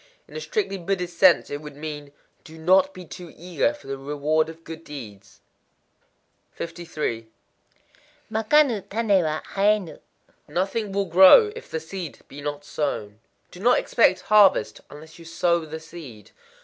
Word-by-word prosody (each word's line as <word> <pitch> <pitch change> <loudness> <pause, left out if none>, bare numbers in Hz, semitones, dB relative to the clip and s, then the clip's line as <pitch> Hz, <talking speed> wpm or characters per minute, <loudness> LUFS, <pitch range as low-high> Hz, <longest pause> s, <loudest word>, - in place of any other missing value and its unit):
In - - -15
a 465 - -4
strictly 420 - -2
Buddhist 180 -1 -3
sense 180 -7 +5
it 145 +1 -4
would 150 -2 -10
mean, 150 -1 -7 0.3
"Do 160 0 -13
not 185 +4 +3
be 185 -1 -11
too 175 0 -10
eager 180 - 0
for 295 - -15
the 135 0 -5
reward 150 +3 0
of 165 0 -12
good 165 0 -9
deeds." 105 -10 -11 1.2
53.—Makanu 175 - -3
tané 205 -3 +2
wa 155 0 -2
haënu. 200 -3 +1 0.5
Nothing 195 +7 -2
will 200 0 0
grow, 190 - +7
if 465 - -10
the 160 - -3
seed 165 0 -7
be 145 +2 -10
not 145 0 -5
sown. 110 -9 -3 0.3
Do 180 - -12
not 245 +5 +4
expect 190 -5 +2
harvest, 210 -2 +4
unless 155 +3 -13
you 165 - -13
sow 170 0 0
the 160 +1 -6
seed. 155 - -12
170 Hz, 150 wpm, -24 LUFS, 150-195 Hz, 1.2 s, grow